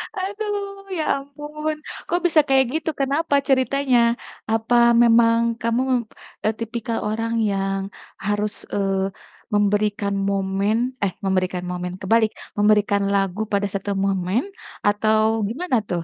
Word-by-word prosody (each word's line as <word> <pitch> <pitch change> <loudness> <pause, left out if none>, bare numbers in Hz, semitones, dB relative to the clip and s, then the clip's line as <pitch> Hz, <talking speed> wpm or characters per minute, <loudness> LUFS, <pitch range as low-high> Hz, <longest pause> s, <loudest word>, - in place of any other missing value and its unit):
Aduh, 400 0 -4
ya 315 - 0 0.2
ampun. 300 +2 -5 0.3
Kok 350 - +1
bisa 325 -3 +5
kayak 265 -1 +4
gitu 320 0 -1
kenapa 285 +3 +1
ceritanya? 265 -1 +3 0.5
Apa 225 +2 +1 0.3
memang 230 0 +5 0.2
kamu, 230 +2 +1 0.6
eee, 215 - +2
tipikal 230 0 -3
orang 225 +2 -2 0.2
yang 195 0 -1 0.4
harus, 210 0 0 0.2
eee, 195 -1 0 0.4
memberikan 205 0 +1 0.2
momen 195 +2 0 0.3
eh, 190 - 0
memberikan 185 -2 0
momen, 180 0 -4
kebalik, 220 +2 +3 0.3
memberikan 205 -1 +3
lagu 195 0 0
pada 200 -1 0
satu 195 +1 -2
momen 195 +3 0 0.4
atau 215 +2 +2
gimana 265 - -1
tuh? 175 -2 -1
215 Hz, 120 wpm, -22 LUFS, 200-270 Hz, 0.6 s, bisa